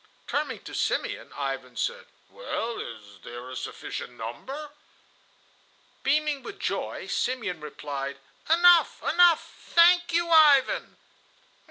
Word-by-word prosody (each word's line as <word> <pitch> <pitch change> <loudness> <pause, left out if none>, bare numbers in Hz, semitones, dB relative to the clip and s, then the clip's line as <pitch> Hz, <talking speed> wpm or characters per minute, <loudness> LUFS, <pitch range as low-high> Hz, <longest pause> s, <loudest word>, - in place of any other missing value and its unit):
Turning - - -2
to - - -10
Simeon - - -2
Ivan 135 -3 -5
said, 480 0 -3 0.2
"Well, 235 - -4
is 105 -3 -9
there 120 +2 -9
a - - -7
sufficient 125 -1 -6
number?" 265 - -7 1.3
Beaming 295 0 +1
with 415 +6 -9
joy, - - -3
Simeon 215 -10 -2
replied: 140 -2 -5 0.3
"Enough! 345 +1 +5
enough! 345 -2 +4 0.2
Thank 345 +1 +6
you, 340 +1 +1
Ivan!" 315 - +4
270 Hz, 110 wpm, -26 LUFS, -, 1.3 s, Thank